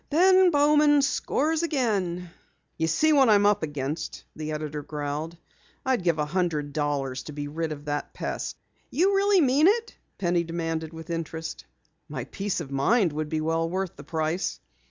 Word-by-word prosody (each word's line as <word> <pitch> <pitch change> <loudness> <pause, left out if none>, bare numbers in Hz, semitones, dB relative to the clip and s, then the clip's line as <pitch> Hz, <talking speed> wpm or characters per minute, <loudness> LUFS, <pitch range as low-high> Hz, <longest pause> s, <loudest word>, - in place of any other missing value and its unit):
"Ben 370 +4 +6
Bowman 295 -1 +4
scores 310 +3 0
again." 200 - -1 0.4
"You 160 - 0
see 310 - +3
what 270 -4 +5
I'm 205 -1 +5
up 205 0 +4
against," 150 +1 -4
the 155 0 -4
editor 150 -1 -4
growled. 150 +2 -4 0.5
"I'd 260 -5 +1
give 170 -3 +2
a 150 - 0
hundred 155 -4 -1
dollars 140 -3 -1
to 150 - -7
be 145 0 -4
rid 160 +2 -3
of 145 -1 -7
that 145 0 -3
pest." - - -4 0.3
"You 385 +4 +2
really 395 -1 +4
mean 285 +3 +4
it?" 460 +3 +1 0.2
Penny 175 -2 +1
demanded 165 -1 -3
with 160 +1 -8
interest. 165 -1 -5 0.4
"My 135 -4 -4
peace 195 +9 -3
of 140 -4 -8
mind 165 - +2
would 155 0 -3
be 155 0 -1
well 165 +1 0
worth 185 0 -3
the 140 - -11
price." 160 +3 -2
165 Hz, 170 wpm, -26 LUFS, -, 0.5 s, Ben